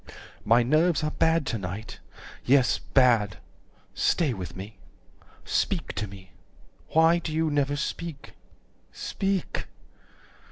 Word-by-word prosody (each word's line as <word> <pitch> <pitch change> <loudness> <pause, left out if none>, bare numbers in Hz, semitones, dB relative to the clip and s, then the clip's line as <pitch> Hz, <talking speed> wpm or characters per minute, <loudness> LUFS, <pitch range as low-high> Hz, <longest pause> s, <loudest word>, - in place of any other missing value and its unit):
110 - - -9
"My 120 +1 +6
nerves 155 +5 +2
are 150 - 0
bad 160 -2 +2
to 115 -4 -2
night. 100 +4 -6 0.4
Yes, 130 0 +3
bad. 115 -8 +3 0.6
Stay 155 -7 +1
with 90 -4 -7
me. 100 +4 -9 0.7
Speak - - -1
to 105 +3 -3
me. 95 -1 -13 0.6
Why 165 +2 +4
do 165 - -5
you 160 0 0
never 145 -1 +1
speak? 150 +1 -5 0.6
Speak. 195 -2 -2
135 Hz, 120 wpm, -26 LUFS, 105-160 Hz, 0.7 s, My